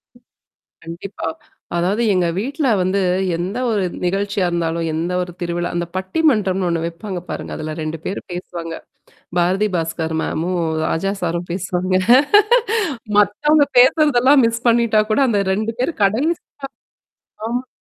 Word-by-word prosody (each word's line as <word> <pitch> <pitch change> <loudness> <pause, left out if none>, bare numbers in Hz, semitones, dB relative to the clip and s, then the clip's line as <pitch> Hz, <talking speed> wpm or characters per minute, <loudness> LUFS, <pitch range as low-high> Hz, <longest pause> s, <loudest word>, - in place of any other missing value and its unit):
ம் 240 - -21 0.6
கண்டிப்பா. 170 +2 -6 0.5
அதாவது 190 +6 0
எங்க 180 -2 +2
வீட்ல 280 +6 -1
வந்து, 185 +2 +1 0.4
எந்த 185 +7 -3
ஒரு 210 -4 +1 0.2
நிகழ்ச்சியா 195 +1 0
இருந்தாலும், 165 -1 -1
எந்த 170 +3 -2
ஒரு 180 0 -5
திருவிழா 175 0 -2
அந்த 175 - -1
பட்டி 190 +9 -3
மன்றம்னு 195 -6 0
ஒண்ணு 165 -1 -1
வைப்பாங்க 175 +2 -5
பாருங்க. - - -5
அதுல 155 0 -5
2 155 +1 -3
பேரு 195 - -3
பேசுவாங்க. 170 -2 -6 0.7
பாரதி 190 +5 +2
பாஸ்கர் 165 -1 -2
மேமும், 175 +2 -2 0.3
ராஜா 195 +4 -1
சாரும் 170 0 -2
பேசுவாங்க. 185 0 -2 1.2
மத்தவங்க 290 +9 +3
பேசுறதெல்லாம் 265 0 +5
மிஸ் 230 0 -3
பண்ணிட்டா 230 -2 +3
கூட 215 - +2
அந்த 210 -4 +2
2 215 +3 -1
பேரும் 260 0 -2
கடைசியா 270 - +1 1.1
அ 250 +2 -2
190 Hz, 130 wpm, -19 LUFS, 170-230 Hz, 1.2 s, பேசுறதெல்லாம்